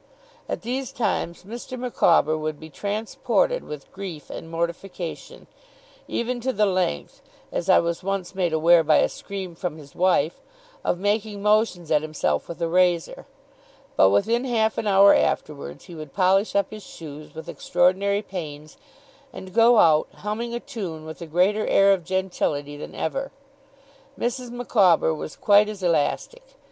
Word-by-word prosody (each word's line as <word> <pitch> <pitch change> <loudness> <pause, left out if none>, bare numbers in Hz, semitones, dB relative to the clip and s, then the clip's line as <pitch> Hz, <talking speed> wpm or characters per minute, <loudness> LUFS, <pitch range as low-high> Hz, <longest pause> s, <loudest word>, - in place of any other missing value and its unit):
At - - -4
these 255 +3 -3
times, 190 -6 -2
Mr. 235 +5 -7
Micawber 175 -10 +3
would 155 -1 -4
be 160 0 -11
transported 220 - -1
with 150 -2 -9
grief 185 -6 -8
and 165 - -8
mortification, 170 +1 -5 0.6
even 240 +1 -2
to 260 +2 0
the 210 -3 +2
length 185 - -1 0.3
(as - - -3
I - - +7
was 170 0 0
once 195 -1 -3
made 180 -3 0
aware 165 +1 +5
by 155 0 +4
a - - +4
scream 190 -3 -7
from 165 -2 -4
his 145 -3 -14
wife) 175 -3 +1 0.4
of - - 0
making 205 +1 -1
motions 210 -6 +2
at 150 -1 +4
himself 155 - -2
with 170 - -7
a - - +1
razor; 175 -1 +1 0.7
but 95 - +6
within 225 - +2
half 225 -4 +1
an 220 - -2
hour 200 0 +7
afterwards, 145 -2 -1
he 180 - -11
would 155 -4 -9
polish 195 +2 +2
up 200 - +1
his 215 0 -8
shoes 155 -5 -11
with 160 - -8
extraordinary 190 +4 +1
pains, 155 -6 -8 0.5
and 185 -1 -10
go 230 +2 +6
out, 155 -6 +5 0.2
humming 230 +3 -3
a - - -2
tune 190 - -6
with 160 +2 -9
a 170 - -6
greater 185 +7 +2
air 195 0 +5
of 185 -3 -2
gentility 165 -6 -2
than 145 - -9
ever. 275 +12 -2 0.9
Mrs. 245 +1 -2
Micawber 210 -9 +3
was 155 -1 -6
quite 205 0 +4
as 205 -3 -7
elastic. 175 - 0
185 Hz, 160 wpm, -24 LUFS, 160-215 Hz, 0.9 s, I